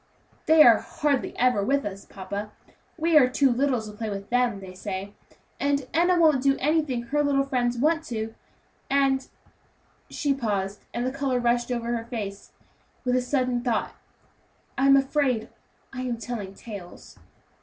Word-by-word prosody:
"They 315 Hz, 0 st, +8 dB
are 235 Hz, -4 st, +7 dB
hardly 285 Hz, -3 st, -1 dB
ever 245 Hz, -5 st, +2 dB
with 275 Hz, +6 st, +1 dB
us, 195 Hz, -1 st, -6 dB
papa; 200 Hz, +2 st, -6 dB, 0.5 s
we 330 Hz, 0 st, +1 dB
are 255 Hz, -3 st, +4 dB
too 270 Hz, +1 st, +3 dB
little 255 Hz, 0 st, +1 dB
to 215 Hz, -, -8 dB
play 215 Hz, +1 st, -5 dB
with 200 Hz, +1 st, -6 dB
them, 245 Hz, -4 st, +1 dB
they 190 Hz, -1 st, -10 dB
say, 195 Hz, +1 st, -6 dB, 0.5 s
and 280 Hz, -2 st, 0 dB
Enna 350 Hz, +3 st, +3 dB
won't 310 Hz, -5 st, +4 dB
do 275 Hz, 0 st, +3 dB
anything 290 Hz, -4 st, 0 dB
her 295 Hz, +5 st, 0 dB
little 280 Hz, -1 st, +2 dB
friends 245 Hz, -3 st, -1 dB
want 310 Hz, +6 st, +3 dB
her -, -, -20 dB
to, 225 Hz, -1 st, -4 dB, 0.5 s
and" 270 Hz, -1 st, +2 dB, 0.8 s
she 285 Hz, -3 st, 0 dB
paused, 205 Hz, -6 st, -3 dB
and 240 Hz, -, -2 dB
the 255 Hz, -, -1 dB
color 275 Hz, -2 st, -1 dB
rushed 240 Hz, 0 st, +1 dB
over 235 Hz, 0 st, -1 dB
her 230 Hz, -1 st, -4 dB
face 205 Hz, -4 st, -6 dB, 0.5 s
with 250 Hz, -, +1 dB
the 255 Hz, -, +3 dB
sudden 250 Hz, -1 st, 0 dB
thought 240 Hz, -3 st, -1 dB, 0.8 s
"I 270 Hz, -, +2 dB
am 275 Hz, 0 st, +7 dB
afraid 270 Hz, -4 st, 0 dB, 0.4 s
I 255 Hz, -, -5 dB
am 245 Hz, -2 st, -2 dB
telling 215 Hz, -4 st, -6 dB
tales." 200 Hz, -6 st, -10 dB
250 Hz, 165 wpm, -25 LUFS, 220-275 Hz, 0.8 s, They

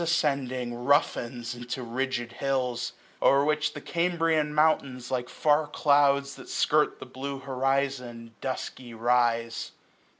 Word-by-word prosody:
Ascending, 135 Hz, -7 st, 0 dB
roughens 120 Hz, -2 st, 0 dB
into 120 Hz, +1 st, -5 dB
rigid 120 Hz, 0 st, -2 dB
hills; 130 Hz, -1 st, -1 dB, 0.3 s
0*er 140 Hz, +1 st, +5 dB
which 150 Hz, 0 st, +1 dB
the -, -, -7 dB
Cambrian 165 Hz, -3 st, +1 dB
mountains, 140 Hz, -5 st, +1 dB
like 125 Hz, -1 st, -1 dB
far 150 Hz, 0 st, +2 dB
clouds 140 Hz, -1 st, +3 dB
That -, -, -12 dB
skirt 150 Hz, 0 st, +2 dB
the -, -, -7 dB
blue 135 Hz, +2 st, -5 dB
horizon, 130 Hz, -3 st, -2 dB
dusky 130 Hz, -2 st, -5 dB
rise. 115 Hz, -1 st, +1 dB
135 Hz, 120 wpm, -27 LUFS, 120-145 Hz, 0.3 s, 0*er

